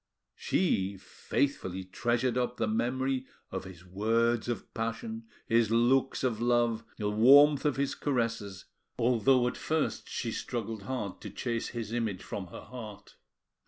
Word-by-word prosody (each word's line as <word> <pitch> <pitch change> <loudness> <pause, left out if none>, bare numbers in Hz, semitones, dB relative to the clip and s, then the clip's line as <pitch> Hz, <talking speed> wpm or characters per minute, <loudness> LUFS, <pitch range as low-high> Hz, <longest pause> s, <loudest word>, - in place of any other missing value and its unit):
She 100 - 0
faithfully 95 -3 -2
treasured 120 +6 0
up 125 -1 -1
the - - 0
memory 130 +4 0 0.2
of - - -4
his 90 -2 -11
words 115 +5 +1
of 120 - -4
passion, 225 - -4 0.2
his 115 -3 +3
looks 125 +4 +2
of 115 -4 0
love, 120 -2 +2
the 105 -2 -1
warmth 140 +7 +7
of 145 - +2
his 140 0 0
caresses, 115 -8 -2 0.3
although 125 +1 +3
at - - -3
first 160 -1 -1
she 115 - -3
struggled 115 -2 -4
hard 105 -7 -4
to - - -6
chase 120 -2 -3
his 115 -2 -5
image 110 -6 -2
from 95 -3 -5
her 90 - -9
heart. 105 -5 -10
115 Hz, 145 wpm, -30 LUFS, 110-130 Hz, 0.3 s, warmth